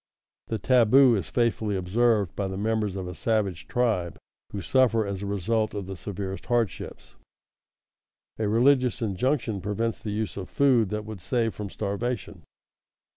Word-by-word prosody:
The 110 - -2
taboo 125 +3 +5
is 95 -6 -3
faithfully 115 -3 0
observed 100 -2 +1
by 100 - -2
the 95 0 -5
members 105 -1 -1
of 95 -2 -4
a 90 - -5
savage 100 -4 -1
tribe 110 - 0 0.3
who 100 - -4
suffer 115 +4 +2
as 100 -1 -4
a 100 - -4
result 110 +3 0
the 95 0 -6
severest 95 +1 -6
hardships. 120 -6 -2 1.3
A 110 - 0
religious 125 +2 +3
injunction 110 0 -1
prevents 105 +4 -2
the 110 - -5
use 105 0 -3
of 95 - -6
food 125 -7 +3
that 105 +1 -3
would 110 -4 -8
save 115 +4 0
from 105 -1 -6
starvation. 100 -1 -4
105 Hz, 150 wpm, -26 LUFS, 95-115 Hz, 1.3 s, taboo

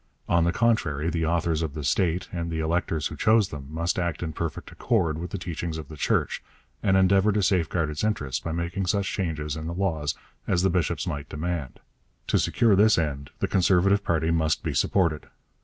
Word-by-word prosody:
On 85 -1 +3
the 85 - +3
contrary, 85 - +1
the 80 0 -1
authorities 80 0 +1
of 80 -3 -3
the 75 - -4
state, 85 +5 +1
and 85 -2 -3
the 80 -1 -3
electors 80 -1 -1
who - - -3
chose 110 -2 +3
them, 70 -2 -8
must 85 +3 -1
act 85 -2 -2
in 80 -2 -4
perfect 85 -1 -5
accord 85 -10 0
with 85 +1 -5
the 100 - -4
teachings 85 -2 -4
of 75 -3 -8
the 80 - -8
Church, 70 - 0 0.4
and 95 -1 +3
endeavour 95 +2 +4
to 105 0 +1
safeguard 85 -4 +1
its 75 - -4
interests 70 - -1
by 80 - -4
making 85 +3 -2
such 100 +1 +1
changes 75 -6 -2
in 80 0 -5
the 85 - -4
laws 80 -6 -1 0.3
as 90 0 +2
the 95 - +3
bishops 85 0 0
might 75 -5 -4
demand. 75 -5 -4 0.5
To - - +3
secure 115 -4 +3
this 105 +3 +5
end 70 -4 -2
the - - +2
Conservative 95 +2 +3
party 80 -2 +1
must 80 -2 +1
be - - -2
supported. 85 -6 +1
85 Hz, 205 wpm, -26 LUFS, 80-95 Hz, 0.5 s, this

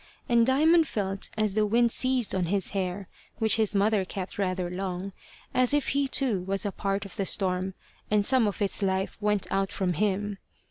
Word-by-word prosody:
And 235 -1 +3
Diamond 315 +5 +4
felt 195 -4 -3
as 215 -2 +1
the 215 +1 +2
wind 235 +2 +3
seized 255 -3 +1
on 185 -2 0
his 190 +2 -1
hair, 190 -1 -3 0.3
which 220 -2 +3
his 215 -2 +1
mother 205 0 +2
kept 185 +1 -6
rather 185 -2 -1
long, 185 +1 -4 0.4
as 255 +2 +3
if 290 - 0
he 280 0 +1
too 255 -8 +1
was 195 +2 -2
a 205 - -1
part 195 +1 -2
of 195 - -11
the 195 - -1
storm, 185 -1 0 0.3
and 210 -1 +2
some 255 -3 +4
of 205 +1 -2
its 200 - +1
life 190 +2 -1
went 210 -2 +1
out 195 0 0
from 185 -2 -1
him. 205 +2 -1
200 Hz, 195 wpm, -27 LUFS, 190-225 Hz, 0.4 s, Diamond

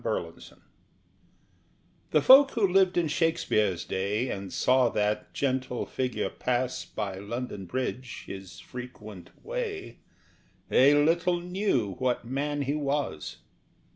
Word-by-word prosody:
GUILIELMUS - - -4
REX - - -25 1.5
The - - +3
folk 270 +2 +9
who 225 -4 +2
lived 190 0 +3
in 170 -2 +2
Shakespeare's 110 - +1
day 105 +6 -1
And 95 -1 -5
saw 130 -1 +3
that 105 0 -1
gentle 130 -2 -1
figure 130 -1 -2
pass 125 0 -1
By 100 -3 -5
London 105 -1 -5
Bridge, 130 +3 -4
his 95 -4 -9
frequent 110 -3 -9 0.2
way 450 -5 -4 0.7
They 140 +3 +6
little 170 +4 +2
knew 175 - 0
what 125 -2 0
man 145 +3 -2
he 140 +1 -1
was. 140 - -2
130 Hz, 120 wpm, -28 LUFS, 105-165 Hz, 1.5 s, folk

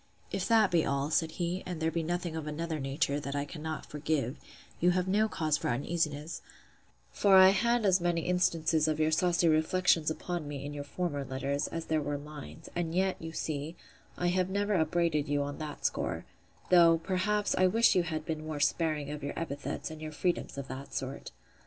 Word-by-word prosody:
If - - -1
that 220 -4 +4
be 170 -2 +3
all, 140 +2 -1
said 160 0 +1
he, 175 +2 -2
and 180 -3 -4
there 160 0 0
be 165 - -1
nothing 175 0 -2
of 160 -1 -4
another 160 +1 -3
nature, 140 +1 0
that 140 -1 -5
I 140 0 -1
cannot 155 +1 -6
forgive, 150 -3 -2 0.4
you 175 - +4
have 180 +1 +1
no 215 +3 +2
cause 155 -5 0
for - - -2
uneasiness; 150 +4 -2 0.7
for 200 -2 +4
I 190 0 +9
had 235 +4 +2
as 190 -2 +4
many 175 -1 +1
instances 165 -3 +2
of 155 0 0
your 155 0 +2
saucy 175 +1 +3
reflections 160 +1 +3
upon 170 0 -4
me 140 -1 -5
in 145 - -5
your 145 -1 -5
former 145 -2 -2
letters, 135 +1 -2
as 165 -1 -5
there 155 -1 +1
were 145 0 -2
lines; 145 - -10
and 170 -1 -2
yet, 190 +1 +1
you 165 0 -5
see, 155 0 -4 0.4
I 175 - +1
have 185 +1 +1
never 205 +2 0
upbraided 160 -3 +1
you 145 0 +1
on 140 0 -5
that 150 -2 -6
score; - - -1 0.5
though, 170 -2 +7
perhaps, 195 +5 0
I 185 - +4
wished 225 +5 +4
you 180 - +4
had 160 -2 -3
been 155 -2 -3
more 155 -2 -4
sparing 150 -1 0
of 150 -1 -6
your 140 - -4
epithets, 145 -2 -4
and 155 0 -9
your 155 0 -5
freedoms 175 -1 -1
of 140 -1 -5
that 135 +2 -7
sort. 135 +1 -4
160 Hz, 200 wpm, -31 LUFS, 145-175 Hz, 0.7 s, I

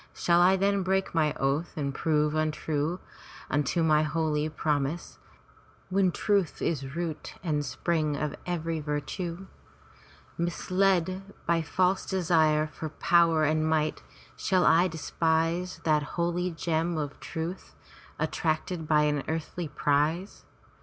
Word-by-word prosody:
Shall 170 0 +3
I 185 +2 +6
then 200 +1 +2
break 190 +1 0
my 155 -3 +2
oath 140 +6 -1
and 140 -2 -2
prove 150 0 +1
untrue 155 +1 -1 0.5
unto 145 +4 +1
my 155 -1 +4
holy 155 0 0
prom 150 -3 0
ise, 170 +4 -7 0.7
when 190 -1 +3
truth 200 -3 0
is 140 -3 -2
root 170 -3 -4
and 150 -4 0
spring 150 +2 -1
of 150 0 -2
every 165 -2 -2
virtue? 165 +5 -4 0.9
Misled 185 +1 +1 0.2
by 170 0 +2
false 185 +4 +1
desire 160 -5 +3
for 155 +1 -6
power 165 0 +3
and 155 +1 +2
might, 155 -1 0 0.3
shall 185 -2 +1
I 175 +3 +5
despise 165 +2 -1
that 155 -2 +3 0.2
holy 175 +1 0
gem 165 0 -1
of 145 -2 -4
truth, 165 +3 -6 0.4
attracted 160 0 -1
by 150 -1 +4
an 150 -1 +1
earthly 165 +1 -3
prize? 150 +6 0
160 Hz, 125 wpm, -28 LUFS, 150-175 Hz, 0.9 s, I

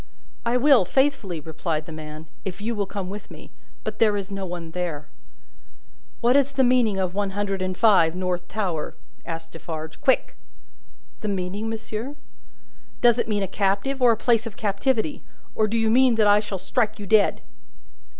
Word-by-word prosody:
"I 240 +1 +3
will 265 -4 +6
faithfully," 265 - +1
replied 155 0 -3
the 165 - -9
man, 155 0 -8 0.2
"if 180 -2 -5
you 225 +3 -2
will 205 -3 -2
come 195 -2 -4
with 200 +2 -8
me. - - -12 0.3
But - - -5
there 210 -2 +4
is 200 0 -5
no 195 -1 -4
one 170 -2 -6
there." 165 -4 -4 1.1
"What 245 +2 +4
is 280 0 +3
the 270 -1 +3
meaning 245 -5 +3
of 185 -2 -1
One 200 0 -2
Hundred 195 -2 -1
and 185 -1 -2
Five, 180 -7 +5
North 180 -1 -2
Tower?" 180 -8 -3 0.3
asked 165 -1 -6
Defarge. 160 -1 -7
"Quick!" 260 - +2 0.8
"The 215 - -4
meaning, 200 +2 -2
monsieur?" 225 +4 -5 0.9
"Does 240 -1 +5
it 225 - -1
mean 205 -2 +1
a - - -1
captive, 200 +8 0
or 245 -2 +6
a 225 - +1
place 230 0 +2
of 220 - -9
captivity? 230 +7 0 0.3
Or 215 - +2
do 225 +2 -1
you 225 -1 +2
mean 255 0 +5
that 220 -1 +3
I 205 0 +6
shall 205 -2 -4
strike 210 +4 -1
you 205 - -7
dead?" 205 +1 +3
205 Hz, 180 wpm, -24 LUFS, 180-230 Hz, 1.1 s, will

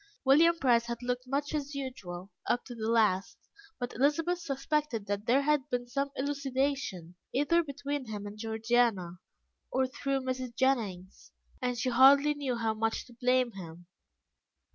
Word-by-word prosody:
William 330 +6 +6
Price 240 -6 +3
had 235 0 -5
looked 250 +1 -2
much 280 +3 -2
as 290 -1 -3
usual, 200 -9 -6 0.2
up 245 - 0
to 245 - -8
the 225 -1 -3
last, 215 -5 +2 0.4
but 245 -1 -4
Elizabeth 325 +7 +1
suspected 285 - -2
that 205 +1 -3
there 265 +4 +4
had 295 -1 +1
been 245 -1 -1
some 275 +3 -1
elucidation 270 - -2 0.2
either 315 +5 +3
between 285 -3 -4
him 210 -2 -5
and 205 0 -7
Georgiana, 220 -5 0 0.5
or 260 +1 +2
through 270 +1 -2
Mrs. 255 -2 -4
Jennings, 210 -9 -1 0.3
and 250 -1 -1
she 245 +2 0
hardly 275 +4 +6
knew 280 -4 -2
how 225 -2 0
much 225 +1 -1
to 245 - -16
blame 250 +1 +2
him. 175 -3 -10
255 Hz, 155 wpm, -30 LUFS, 225-280 Hz, 0.5 s, William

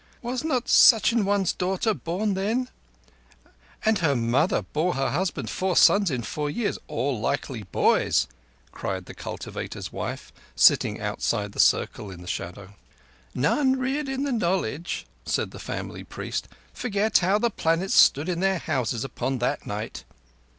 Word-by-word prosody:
"Was 245 +3 -3
not 255 -6 -1
such 225 -1 +7
an 230 -3 +1
one's 200 -2 +1
daughter 190 +4 0
born 195 +3 -2
then—" 225 +7 -1 1.2
"And 220 -2 +3
her 145 -5 +2
mother 120 +8 +1
bore 170 +4 -1
her 135 0 0
husband 180 +5 -2
four 185 -1 -1
sons 200 -2 +6
in 125 -5 -2
four 150 +5 -3
years 210 +7 -2
all 140 -5 -2
likely 130 0 -2
boys," - - +2 0.5
cried 95 -1 -4
the - - -10
cultivator's - - -6
wife, - - -5 0.2
sitting - - +4
outside 105 -1 -2
the - - -10
circle 105 - +2
in 90 -2 -10
the - - -12
shadow. 95 +3 -6 0.6
"None 260 - +2
reared 270 +3 -2
in 270 +1 -2
the 285 - -1
knowledge," 175 - -1 0.2
said - - -1
the - - -10
family - - -6
priest, - - -5 0.3
"forget 215 -2 +1
how 190 +3 +2
the 235 +2 +1
planets 165 +1 0
stood 145 +4 +5
in 175 -2 -1
their 190 0 +2
Houses 120 -7 -2
upon 135 0 -3
that 125 0 -2
night." 105 +2 -5
180 Hz, 155 wpm, -25 LUFS, 130-215 Hz, 1.2 s, such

